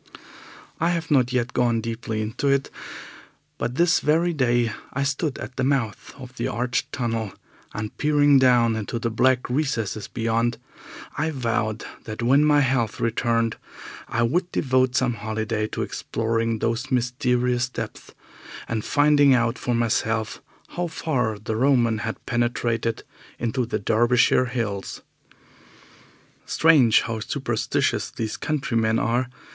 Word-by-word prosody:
I 170 Hz, -, +2 dB
have 165 Hz, -2 st, -2 dB
not 130 Hz, -3 st, +3 dB
yet 125 Hz, -1 st, -1 dB
gone 120 Hz, -2 st, +2 dB
deeply 110 Hz, -1 st, -3 dB
into 110 Hz, +6 st, -3 dB
it, 140 Hz, 0 st, +1 dB, 0.9 s
but 120 Hz, -, -2 dB
this 175 Hz, +3 st, +3 dB
very 165 Hz, +4 st, +2 dB
day 120 Hz, -5 st, +1 dB, 0.2 s
I 140 Hz, -, -1 dB
stood 140 Hz, +1 st, -1 dB
at 130 Hz, -, -8 dB
the 130 Hz, -, 0 dB
mouth 130 Hz, -6 st, -1 dB
of 130 Hz, -1 st, -11 dB
the 115 Hz, -, -1 dB
arched 125 Hz, +3 st, -2 dB
tunnel, 115 Hz, -5 st, -2 dB, 0.4 s
and 105 Hz, 0 st, -5 dB
peering 145 Hz, -2 st, +4 dB
down 120 Hz, -3 st, +4 dB
into 110 Hz, +1 st, -3 dB
the 115 Hz, 0 st, -2 dB
black 130 Hz, +3 st, +2 dB
recesses 115 Hz, -7 st, -2 dB
beyond, 115 Hz, +1 st, 0 dB, 0.6 s
I 160 Hz, +2 st, +1 dB
vowed 115 Hz, -6 st, -2 dB, 0.2 s
that 110 Hz, +1 st, -5 dB
when 135 Hz, +5 st, +4 dB
my 150 Hz, -1 st, +4 dB
health 125 Hz, -5 st, 0 dB
returned 115 Hz, 0 st, 0 dB, 0.5 s
I 120 Hz, -, 0 dB
would 175 Hz, +9 st, 0 dB
devote 130 Hz, -2 st, +1 dB
some 125 Hz, -1 st, +2 dB
holiday 110 Hz, 0 st, -2 dB
to -, -, -3 dB
exploring 115 Hz, 0 st, -2 dB
those 115 Hz, +4 st, -2 dB
mysterious 125 Hz, 0 st, 0 dB
depths -, -, -7 dB, 0.6 s
and 110 Hz, -2 st, -2 dB
finding 145 Hz, -2 st, +4 dB
out 115 Hz, 0 st, 0 dB
for 120 Hz, -, -1 dB
myself 110 Hz, -1 st, 0 dB, 0.3 s
how 175 Hz, 0 st, -3 dB
far 125 Hz, -9 st, -1 dB
the 110 Hz, +1 st, -4 dB
Roman 120 Hz, -3 st, +2 dB
had 110 Hz, +1 st, -5 dB
penetrated 120 Hz, -1 st, -1 dB, 0.3 s
into 120 Hz, +1 st, -1 dB
the 110 Hz, -, -1 dB
Derbyshire 120 Hz, +4 st, +3 dB
hills. 115 Hz, -6 st, -4 dB, 1.4 s
Strange 145 Hz, -9 st, +5 dB
how 115 Hz, -1 st, -4 dB
superstitious 110 Hz, -, -1 dB
these 110 Hz, -1 st, -4 dB
countrymen 115 Hz, -7 st, 0 dB
are! 120 Hz, +3 st, 0 dB
120 Hz, 135 wpm, -24 LUFS, 115-130 Hz, 1.4 s, Strange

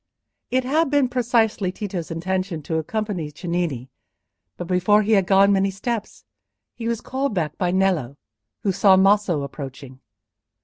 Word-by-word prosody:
It 255 Hz, 0 st, +1 dB
had 300 Hz, +4 st, +1 dB
been 285 Hz, -3 st, +2 dB
precisely 230 Hz, -6 st, +1 dB
Tito's 185 Hz, -4 st, -5 dB
intention 185 Hz, 0 st, -3 dB
to 160 Hz, -, -2 dB
accompany 185 Hz, -1 st, -3 dB
Cennini, 160 Hz, -6 st, -3 dB, 0.7 s
but 175 Hz, -, -5 dB
before 185 Hz, +4 st, +3 dB
he 215 Hz, -, -1 dB
had 195 Hz, -4 st, +3 dB
gone 195 Hz, +1 st, +5 dB
many 195 Hz, 0 st, +2 dB
steps, 210 Hz, -, -5 dB, 0.5 s
he 230 Hz, -1 st, -6 dB
was 230 Hz, -1 st, -1 dB
called 265 Hz, -3 st, -2 dB
back 155 Hz, -4 st, -1 dB
by 180 Hz, -, +1 dB
Nello, 175 Hz, -8 st, 0 dB, 0.5 s
who 200 Hz, -, +2 dB
saw 195 Hz, 0 st, +5 dB
Maso 195 Hz, -5 st, +3 dB
approaching. 135 Hz, -2 st, -8 dB
190 Hz, 145 wpm, -22 LUFS, 165-215 Hz, 0.7 s, gone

